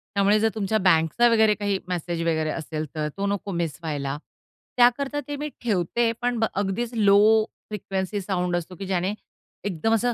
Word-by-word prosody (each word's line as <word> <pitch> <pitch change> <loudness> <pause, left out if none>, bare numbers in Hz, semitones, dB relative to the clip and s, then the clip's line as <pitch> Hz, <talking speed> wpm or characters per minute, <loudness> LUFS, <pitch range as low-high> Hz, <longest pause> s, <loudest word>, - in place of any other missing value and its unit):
त्यामुळे 200 +2 +4
जर 225 +1 +3
तुमच्या 215 +1 0
बँकचा 165 +7 +4
वगैरे 220 -2 +4
काही 205 -1 -1
मेसेज 175 -1 -2
वगैरे 160 -2 0
असेल, 155 0 -4
तर 155 -1 -1
तो 200 - -1
नको 200 0 -2
मिस 170 -5 -2
व्हायला. 145 -3 -3 0.6
त्याकरता 270 +4 +3
ते 290 - -3
मी 300 - -3
ठेवते 230 +2 +1
पण 245 -1 0
ब 225 - +3 0.2
अगदीच 225 +5 -2
लो 205 -3 +5 0.5
फ्रिक्वेन्सी 195 -1 -3
साउंड 180 -2 -1
असतो, 175 +1 -4
की 195 - -7
ज्याने 185 +1 0 0.5
एकदम 205 +3 0
असं 245 +2 +1
195 Hz, 170 wpm, -24 LUFS, 170-225 Hz, 0.6 s, लो